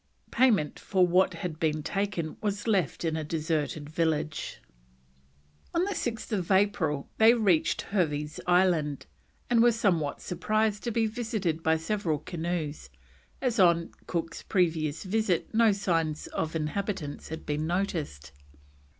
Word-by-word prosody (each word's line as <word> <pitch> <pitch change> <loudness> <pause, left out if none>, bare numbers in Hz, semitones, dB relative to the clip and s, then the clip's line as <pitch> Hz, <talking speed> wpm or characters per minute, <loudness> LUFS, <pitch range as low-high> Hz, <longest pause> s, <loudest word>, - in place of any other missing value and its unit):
Payment 225 - +3
for 185 -2 +2
what 180 +1 +3
had 165 -2 -5
been 155 -1 0
taken 195 -5 -2
was 205 -1 -2
left 190 -6 +1
in 160 -1 0
a 160 - -2
deserted 155 -1 -2
village. 155 -1 -1 1.2
On 340 +2 +3
6th 225 - -3
April 185 -7 +2
they 225 +2 +7
reached 180 -8 +2
Hervey's 150 -6 -1
Island, 175 -6 +2 0.4
and 235 -1 +4
were 240 0 +6
somewhat 180 -10 0
surprised 215 +3 0
to 235 - 0
be 230 0 +1
visited 220 -8 -2
by 160 0 +2
several 165 -1 -1
canoes, 160 -1 -4 0.5
as 245 -3 0
on 170 -2 +4 0.2
Cook's 165 -1 -3
previous 160 -5 0
visit 200 -2 0
no 225 0 +5
signs 165 -6 0
of 160 0 -3
inhabitants 155 -1 -3
had 160 0 -6
been 150 +1 -1
noticed. 160 - -2
175 Hz, 130 wpm, -28 LUFS, 155-205 Hz, 1.2 s, they